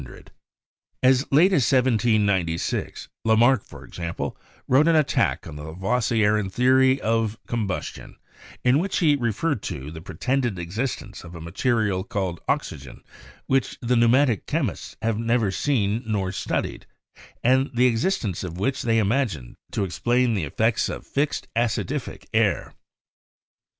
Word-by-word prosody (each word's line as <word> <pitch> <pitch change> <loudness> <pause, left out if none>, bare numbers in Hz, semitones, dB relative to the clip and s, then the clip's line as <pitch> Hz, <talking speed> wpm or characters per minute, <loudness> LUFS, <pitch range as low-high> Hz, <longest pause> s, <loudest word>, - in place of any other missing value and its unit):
As 130 +2 +3
late 170 +8 +5
as 140 -9 +3
1796, 105 -9 +1 0.2
Lamarck, 115 +1 +4
for - - -13
example, 85 -1 -5 0.3
wrote 140 +5 +4
an 165 - +4
attack 155 -3 +1
on 75 - -8
the 75 - -8
Lavoisierian 105 +3 0
theory 130 +3 +4
of 115 -2 0
combustion, 110 -6 -4 0.5
in 125 +3 +4
which 190 +3 -1
he 155 -4 +4
re 120 -4 0
ferred 140 +2 -1
to 70 -2 -6
the 80 0 -9
"pretended 120 +6 -1
existence 100 +3 -4
of 90 0 -11
a - - -7
material 100 +3 0
called 95 -4 -3
oxygen - - -3 0.4
which 135 -1 0
the 125 0 0
pneumatic 120 - +3
chemists - - -3
have 115 -1 0
never 115 -3 +1
seen 110 -2 0
nor 100 -4 -1
studied, 95 - -3 0.6
and 130 +3 +3
the 125 +1 +4
existence 115 - 0
of 90 -2 -6
which 115 +8 -1
they 115 -1 +1
imagine 105 - 0 0.2
to 100 - -1
ex 90 - -7
plain 120 0 +2
the 95 -7 -1
effects 110 - 0
of - - -6
'fixed 145 +1 -1
acidific 115 -1 -2
air.' - - +1
115 Hz, 140 wpm, -24 LUFS, 95-130 Hz, 0.6 s, late